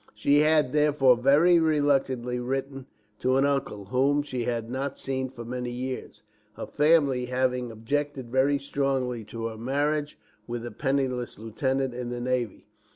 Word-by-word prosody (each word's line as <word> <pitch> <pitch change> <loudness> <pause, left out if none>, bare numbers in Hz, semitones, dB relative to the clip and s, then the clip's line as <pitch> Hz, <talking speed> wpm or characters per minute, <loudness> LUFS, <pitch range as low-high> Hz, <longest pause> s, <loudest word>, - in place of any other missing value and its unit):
She 140 +7 +3
had, 150 -3 +3
therefore, 150 -4 +4
very 145 +8 +5
reluctantly 135 -6 +1
written 135 +1 -4 0.3
to 130 +1 +2
an 135 - +3
uncle, 135 -8 -1
whom 135 +6 +2
she 125 -4 -4
had 115 -2 -2
not 135 +3 -3
seen 130 -1 -3
for 120 -2 -9
many 125 +1 -4
years, 130 +1 -6 0.3
her - - -5
family 145 -4 +3
having 125 -1 -1
objected 130 +3 -3
very 135 +2 +3
strongly 135 -4 -1
to 115 +2 -6
her 110 -1 -4
marriage 145 +4 -1 0.3
with 120 0 -4
a 120 - -6
penniless 130 0 -1
lieutenant 130 +4 -2
in 120 0 -5
the 120 0 -4
navy. 125 -3 -2
130 Hz, 155 wpm, -27 LUFS, 120-140 Hz, 0.3 s, very